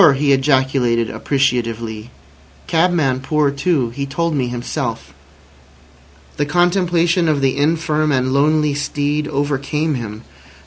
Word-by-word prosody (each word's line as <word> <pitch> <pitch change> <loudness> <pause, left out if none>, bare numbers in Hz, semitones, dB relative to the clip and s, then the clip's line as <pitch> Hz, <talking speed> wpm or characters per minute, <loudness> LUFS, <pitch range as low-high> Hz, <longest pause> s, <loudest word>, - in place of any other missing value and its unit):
he 140 0 +2
ejaculated 130 -4 +1
appreciatively. 115 -5 -2 0.6
"Cabman 160 -6 +1
poor 145 +1 +1
too. 140 -4 0
He 140 +3 -4
told 170 +4 -1
me 130 -4 0
himself." 120 - -4 1.2
The 145 - 0
contemplation 175 0 +2
of 150 -2 +1
the 135 -1 +1
infirm 155 +1 +1
and 130 -1 0
lonely 150 +1 +2
steed 145 +1 -2
overcame 145 +2 -1
him. 110 -3 -6
140 Hz, 115 wpm, -18 LUFS, 130-155 Hz, 1.2 s, he